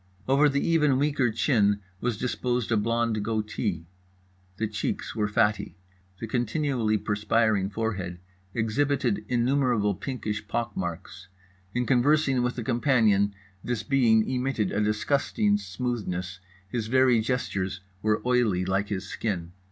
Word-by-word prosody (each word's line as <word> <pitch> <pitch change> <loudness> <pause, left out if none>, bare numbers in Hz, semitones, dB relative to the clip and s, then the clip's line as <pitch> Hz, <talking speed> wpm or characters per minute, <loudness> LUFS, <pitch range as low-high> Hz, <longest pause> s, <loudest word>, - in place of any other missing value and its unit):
Over 140 +3 +5
the 140 0 0
even 150 -5 +3
weaker 140 -4 +1
chin 105 -3 +2 0.2
was 120 -1 -1
disposed 125 -1 -1
a - - +4
blond 115 0 0
goatee. 105 -5 -2 0.7
The 110 - 0
cheeks 105 +1 -3
were 105 -2 +1
fatty. 105 -2 0 0.4
The - - -4
continually 120 -1 0
perspiring 105 -1 +1
forehead 100 -5 -3 0.3
exhibited 120 0 0
innumerable 120 -4 +2
pinkish 105 -2 -4
pock 115 0 -2
marks. 95 +1 -5 0.5
In 125 0 +1
conversing 135 +1 +3
with 125 +1 -1
a 120 - -3
companion 110 -5 +2 0.3
this 120 -3 -2
being 115 -3 +3
emitted 125 -5 -1
a 105 - 0
disgusting 105 -1 +1
smoothness, 95 -3 -4 0.3
his 110 +2 -3
very 130 -1 +4
gestures 100 -6 -2 0.2
were 105 +1 +1
oily 115 -8 +2
like 95 +2 0
his 95 -2 -3
skin. 90 -6 -3
110 Hz, 130 wpm, -27 LUFS, 105-125 Hz, 0.7 s, Over